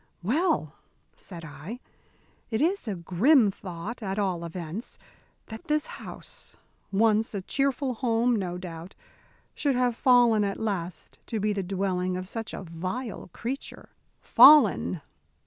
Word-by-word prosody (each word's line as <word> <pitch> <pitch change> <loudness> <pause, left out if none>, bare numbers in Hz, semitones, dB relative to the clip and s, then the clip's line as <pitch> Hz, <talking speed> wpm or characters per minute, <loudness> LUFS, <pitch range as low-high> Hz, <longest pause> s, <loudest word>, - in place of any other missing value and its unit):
"Well," 265 - +1 0.4
said 170 -3 -10
I, 165 - -8 0.7
"it 220 -2 -1
is 345 +1 0
a 205 - -2
grim 200 - +4
thought, 190 +5 -7
at 195 -1 -3
all 185 -4 -1
events, 170 +5 -6 0.5
that 220 0 -10
this 300 0 +1
house, - - -9 0.3
once 215 +2 +2
a 195 - -3
cheerful 275 +2 0
home, 235 0 +1
no 180 -4 -3
doubt, 175 0 -8 0.6
should 280 -3 0
have 245 -1 +1
fallen 240 -4 +4
at 200 -1 -2
last 185 -5 -4
to 225 - -2
be 210 +1 +1
the 200 - -2
dwelling 185 -1 -1
of 185 0 -6
such 225 +2 -5
a - - -6
vile 185 +8 -5
creature." 255 +8 -6 0.3
"Fallen!" 225 - +6
210 Hz, 135 wpm, -27 LUFS, 180-245 Hz, 0.7 s, Fallen